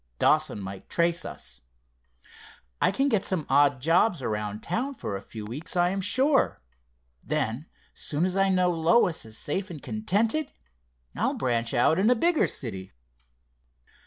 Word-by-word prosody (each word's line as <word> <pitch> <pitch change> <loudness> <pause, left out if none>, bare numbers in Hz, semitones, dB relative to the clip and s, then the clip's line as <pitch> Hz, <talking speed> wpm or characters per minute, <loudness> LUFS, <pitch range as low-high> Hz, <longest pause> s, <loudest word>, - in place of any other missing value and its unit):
Dawson - - +2
might 95 -1 -8
trace 170 0 +1
us. - - -7 1.2
I - - +4
can 270 +8 +1
get 215 -8 +2
some 175 -6 -1
odd 140 0 +4
jobs 170 0 +3
around 105 -1 -3
town 255 +11 -2
for 100 - -5
a 95 - -5
few 105 +1 -9
weeks, 140 +11 -5
I 175 0 +3
am 195 +1 -2
sure. 265 - +3 0.6
Then, 120 +8 -2 0.3
soon 155 +4 -1
as 185 0 -1
I 195 0 +3
know 185 -1 +3
Lois 165 - +2
is 110 0 -10
safe 190 +6 -3
and 165 -4 -7
contented, 220 - -1 0.6
I'll - - 0
branch 120 -3 -1
out 155 +8 +3
in 205 +4 +3
a 250 - +5
bigger 335 +7 +2
city." 95 -7 -3
170 Hz, 155 wpm, -26 LUFS, 120-200 Hz, 1.2 s, a